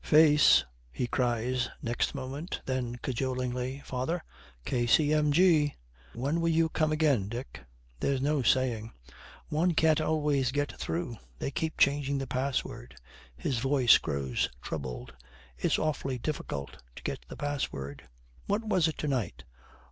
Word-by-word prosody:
'Face!' 150 Hz, -1 st, +6 dB, 0.3 s
he 125 Hz, -, -2 dB
cries, 120 Hz, +1 st, 0 dB
next 120 Hz, 0 st, -1 dB
moment. 140 Hz, +7 st, -5 dB
Then 125 Hz, -2 st, -2 dB
cajolingly, 130 Hz, +1 st, -2 dB
'Father, 135 Hz, +7 st, -2 dB, 0.4 s
K.C.M.G.!' 150 Hz, +5 st, +3 dB, 0.4 s
'When 140 Hz, +8 st, 0 dB
will 165 Hz, -, +2 dB
you 165 Hz, 0 st, +3 dB
come 155 Hz, -1 st, +1 dB
again, 145 Hz, -10 st, +2 dB
Dick?' 120 Hz, -, -6 dB, 0.4 s
'There's 140 Hz, -1 st, +1 dB
no 145 Hz, +1 st, +1 dB
saying. 115 Hz, -2 st, +1 dB, 0.6 s
One 165 Hz, +3 st, +1 dB
can't 160 Hz, 0 st, +4 dB
always 150 Hz, -4 st, +1 dB
get 145 Hz, +1 st, -1 dB
through. 165 Hz, -9 st, -3 dB, 0.2 s
They 135 Hz, -, -3 dB
keep 160 Hz, +3 st, -2 dB
changing 140 Hz, 0 st, +3 dB
the 135 Hz, -, -2 dB
password.' 130 Hz, -, -3 dB, 0.4 s
His 125 Hz, -, -1 dB
voice 130 Hz, -2 st, +5 dB
grows 70 Hz, -4 st, -1 dB
troubled. 65 Hz, -4 st, -6 dB, 0.5 s
'It's -, -, +2 dB
awfully 140 Hz, -4 st, -1 dB
difficult 75 Hz, -, -4 dB
to -, -, -11 dB
get -, -, -4 dB
the -, -, -9 dB
password.' 70 Hz, -, -4 dB, 0.4 s
'What 205 Hz, +3 st, 0 dB
was 185 Hz, -6 st, +3 dB
it 160 Hz, -, -3 dB
to 150 Hz, -, -3 dB
night?' 120 Hz, -, -2 dB
135 Hz, 135 wpm, -30 LUFS, 120-155 Hz, 0.6 s, Face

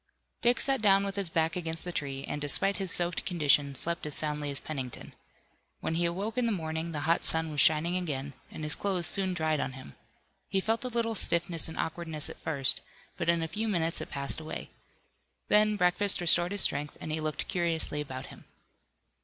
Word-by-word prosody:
Dick 240 Hz, 0 st, +2 dB
sat 270 Hz, -3 st, +1 dB
down 195 Hz, -2 st, +4 dB
with 195 Hz, -1 st, -4 dB
his 200 Hz, -4 st, +1 dB
back 160 Hz, 0 st, 0 dB
against 165 Hz, -2 st, +1 dB
the 175 Hz, -, -4 dB
tree, 135 Hz, -4 st, -4 dB
and, 145 Hz, -, -4 dB
despite 190 Hz, +7 st, +1 dB
his 190 Hz, -1 st, -2 dB
soaked 175 Hz, 0 st, +1 dB
condition, 145 Hz, -5 st, +2 dB
slept 170 Hz, +5 st, -2 dB
as 150 Hz, -, +1 dB
soundly 150 Hz, -1 st, +3 dB
as 140 Hz, -, -3 dB
Pennington. 135 Hz, -5 st, -6 dB, 0.7 s
When -, -, -3 dB
he 170 Hz, +1 st, +1 dB
awoke 200 Hz, +7 st, -2 dB
in 240 Hz, -, +1 dB
the -, -, 0 dB
morning 160 Hz, -3 st, -3 dB
the 150 Hz, -2 st, -4 dB
hot 165 Hz, +3 st, +1 dB
sun 160 Hz, -1 st, +1 dB
was 145 Hz, -2 st, +3 dB
shining 160 Hz, +4 st, +4 dB
again, 145 Hz, -6 st, -3 dB, 0.2 s
and 155 Hz, -, -8 dB
his 150 Hz, -1 st, +2 dB
clothes 190 Hz, -4 st, -1 dB
soon 190 Hz, 0 st, +3 dB
dried 155 Hz, -2 st, 0 dB
on 135 Hz, -, -3 dB
him. 130 Hz, -, -12 dB, 0.5 s
He 195 Hz, -, +1 dB
felt 225 Hz, +5 st, -1 dB
a -, -, -2 dB
little 230 Hz, -2 st, -1 dB
stiffness 170 Hz, -4 st, +1 dB
and 160 Hz, -, -8 dB
awkwardness 160 Hz, -2 st, -2 dB
at -, -, -13 dB
first, 140 Hz, -5 st, +1 dB, 0.3 s
but -, -, -2 dB
in 170 Hz, -1 st, +2 dB
a -, -, -2 dB
few 215 Hz, +8 st, -3 dB
minutes 165 Hz, -5 st, -1 dB
it -, -, -7 dB
passed 140 Hz, +2 st, -2 dB
away. 160 Hz, 0 st, -7 dB, 0.8 s
Then 210 Hz, 0 st, +4 dB
breakfast 190 Hz, +1 st, +2 dB
restored 175 Hz, +1 st, +4 dB
his 205 Hz, -, +5 dB
strength, 145 Hz, 0 st, +2 dB
and 155 Hz, -, -6 dB
he 155 Hz, 0 st, -2 dB
looked 155 Hz, -1 st, -3 dB
curiously 165 Hz, -5 st, +1 dB
about 130 Hz, -2 st, -7 dB
him. -, -, -14 dB
165 Hz, 205 wpm, -29 LUFS, 150-190 Hz, 0.8 s, his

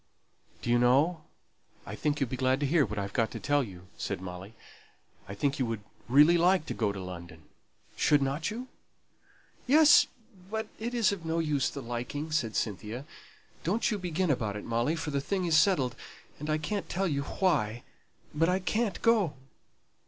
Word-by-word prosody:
"Do 120 Hz, -, 0 dB
you 120 Hz, -, +4 dB
know, 150 Hz, +7 st, +3 dB, 0.6 s
I -, -, -7 dB
think 150 Hz, -1 st, -1 dB
you'll 135 Hz, -4 st, 0 dB
be -, -, -1 dB
glad 130 Hz, +1 st, +1 dB
to -, -, +2 dB
hear 150 Hz, 0 st, +3 dB
what 105 Hz, -, -6 dB
I've 100 Hz, 0 st, -3 dB
got 115 Hz, -3 st, +1 dB
to -, -, -7 dB
tell 145 Hz, 0 st, +2 dB
you," 90 Hz, -5 st, -10 dB
said 100 Hz, -, -3 dB
Molly. 95 Hz, +3 st, -8 dB, 0.7 s
"I 100 Hz, -, -7 dB
think 140 Hz, +7 st, -1 dB
you 130 Hz, -, +2 dB
would 115 Hz, -2 st, -3 dB, 0.3 s
really 150 Hz, +6 st, +6 dB
like 180 Hz, -1 st, +3 dB
to -, -, -4 dB
go 105 Hz, -3 st, 0 dB
to 100 Hz, -, -6 dB
London; 85 Hz, -3 st, -9 dB, 0.5 s
shouldn't 145 Hz, +2 st, +2 dB
you?" 245 Hz, +4 st, -6 dB, 1.0 s
"Yes, 300 Hz, +3 st, +7 dB, 0.4 s
but 220 Hz, +1 st, -2 dB
it's 230 Hz, -3 st, +1 dB
of 195 Hz, -4 st, -5 dB
no 160 Hz, 0 st, -1 dB
use 150 Hz, -5 st, 0 dB
liking," 135 Hz, +4 st, -4 dB
said 120 Hz, -8 st, 0 dB
Cynthia. 110 Hz, +5 st, -3 dB, 0.6 s
"Don't 225 Hz, +7 st, +1 dB
you 210 Hz, -, -1 dB
begin 180 Hz, -1 st, 0 dB
about 110 Hz, -6 st, -1 dB
it, 105 Hz, -, -6 dB
Molly, 120 Hz, +7 st, 0 dB
for 155 Hz, -2 st, -4 dB
the 140 Hz, -1 st, 0 dB
thing 190 Hz, +4 st, -1 dB
is 165 Hz, -2 st, +2 dB
settled; 150 Hz, -9 st, +3 dB, 0.4 s
and 150 Hz, +2 st, -5 dB
I 155 Hz, -, +2 dB
can't 195 Hz, +7 st, -3 dB
tell 195 Hz, +2 st, 0 dB
you 140 Hz, -4 st, 0 dB
why, 140 Hz, -, 0 dB, 0.5 s
but 165 Hz, +3 st, +2 dB
I 180 Hz, -, +3 dB
can't 210 Hz, +2 st, -1 dB
go." 215 Hz, -10 st, +3 dB
145 Hz, 180 wpm, -29 LUFS, 120-180 Hz, 1.0 s, Yes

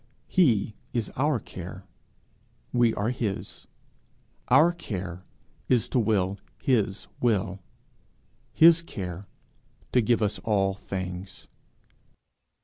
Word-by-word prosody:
He 115 Hz, -, +3 dB, 0.2 s
is 120 Hz, -3 st, -2 dB
our 145 Hz, -1 st, +1 dB
care; 95 Hz, -1 st, -9 dB, 0.9 s
we 120 Hz, -2 st, +4 dB
are 105 Hz, +4 st, 0 dB
his; 110 Hz, -6 st, -4 dB, 0.8 s
our 155 Hz, +7 st, +6 dB
care 95 Hz, -, -6 dB, 0.4 s
is 125 Hz, -3 st, +3 dB
to 125 Hz, -, +2 dB
will 100 Hz, -3 st, +1 dB, 0.2 s
his 105 Hz, -6 st, +1 dB
will; 100 Hz, -5 st, 0 dB, 0.9 s
his 165 Hz, +1 st, +7 dB
care, 95 Hz, -, -6 dB, 0.6 s
to 125 Hz, -, +4 dB
give 115 Hz, 0 st, +2 dB
us 105 Hz, -, 0 dB
all 100 Hz, -3 st, +1 dB
things. 95 Hz, -1 st, -6 dB
105 Hz, 100 wpm, -27 LUFS, 95-125 Hz, 0.9 s, his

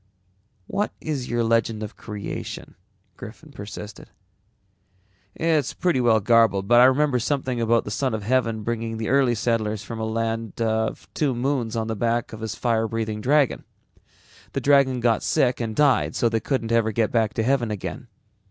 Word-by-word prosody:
"What 205 Hz, -, -2 dB
is 140 Hz, -5 st, -4 dB
your 120 Hz, 0 st, 0 dB
legend 115 Hz, -1 st, +1 dB
of 105 Hz, -, -7 dB
creation?" 105 Hz, -2 st, -7 dB, 0.4 s
Griffin -, -, -11 dB
persisted. 105 Hz, +1 st, -9 dB, 1.3 s
"It's 160 Hz, -5 st, 0 dB
pretty 175 Hz, -8 st, +1 dB
well 115 Hz, -2 st, +4 dB
garbled 110 Hz, -3 st, +3 dB
but 120 Hz, +2 st, +6 dB
I -, -, +8 dB
remember 130 Hz, 0 st, +3 dB
something 130 Hz, -1 st, -1 dB
about 115 Hz, 0 st, +2 dB
the 105 Hz, -, -5 dB
Son 130 Hz, 0 st, -1 dB
of 105 Hz, -, -5 dB
Heaven 115 Hz, -1 st, 0 dB
bringing 115 Hz, 0 st, -3 dB
the 110 Hz, -, -3 dB
early 130 Hz, -2 st, +3 dB
settlers 110 Hz, -2 st, -1 dB
from 115 Hz, +3 st, -7 dB
a -, -, -2 dB
land 115 Hz, 0 st, -3 dB
of 110 Hz, -1 st, -1 dB
two 140 Hz, -5 st, 0 dB
moons 120 Hz, -2 st, -1 dB
on 115 Hz, -1 st, -1 dB
the 110 Hz, 0 st, -3 dB
back 115 Hz, +2 st, -1 dB
of 110 Hz, -, -8 dB
his 110 Hz, 0 st, -4 dB
fire 115 Hz, -2 st, 0 dB
breathing 110 Hz, -1 st, -3 dB
dragon. 140 Hz, +2 st, +2 dB, 0.9 s
The -, -, -2 dB
dragon 135 Hz, -3 st, +3 dB
got 115 Hz, -2 st, +2 dB
sick 125 Hz, -1 st, +1 dB
and 110 Hz, -2 st, -3 dB
died 145 Hz, -3 st, +2 dB
so 120 Hz, -, +2 dB
they 115 Hz, 0 st, 0 dB
couldn't 115 Hz, -2 st, -2 dB
ever 115 Hz, -1 st, +2 dB
get 110 Hz, 0 st, 0 dB
back 110 Hz, -2 st, +1 dB
to 115 Hz, -, 0 dB
heaven 125 Hz, -1 st, +1 dB
again. 105 Hz, -2 st, -5 dB
115 Hz, 175 wpm, -24 LUFS, 110-130 Hz, 1.3 s, I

